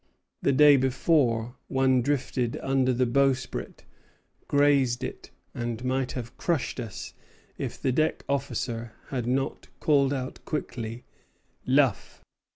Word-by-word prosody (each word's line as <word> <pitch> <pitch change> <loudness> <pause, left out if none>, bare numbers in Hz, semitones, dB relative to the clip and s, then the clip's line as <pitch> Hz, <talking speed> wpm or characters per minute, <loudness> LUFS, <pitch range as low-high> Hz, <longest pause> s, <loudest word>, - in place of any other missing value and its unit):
The - - +3
day 145 +1 +7
before, 125 -3 +1
one 130 -1 +3
drifted 125 -2 -1
under 135 -1 +2
the 125 +1 +2
bowsprit, 135 +1 0 0.6
grazed 140 -4 +3
it, - - -6 0.2
and 120 0 -4
might 130 0 0
have 120 -2 -6
crushed 160 -6 -1
us 115 -4 -6 0.5
if - - -4
the 130 - +1
deck 155 +5 0
officer 120 -4 -2 0.2
had 125 -4 -2
not 135 +2 -1
called 140 -3 +3
out 130 -1 -4
quickly, 115 -6 -4 0.6
Luff. 130 -6 +1
130 Hz, 120 wpm, -27 LUFS, 120-140 Hz, 0.6 s, day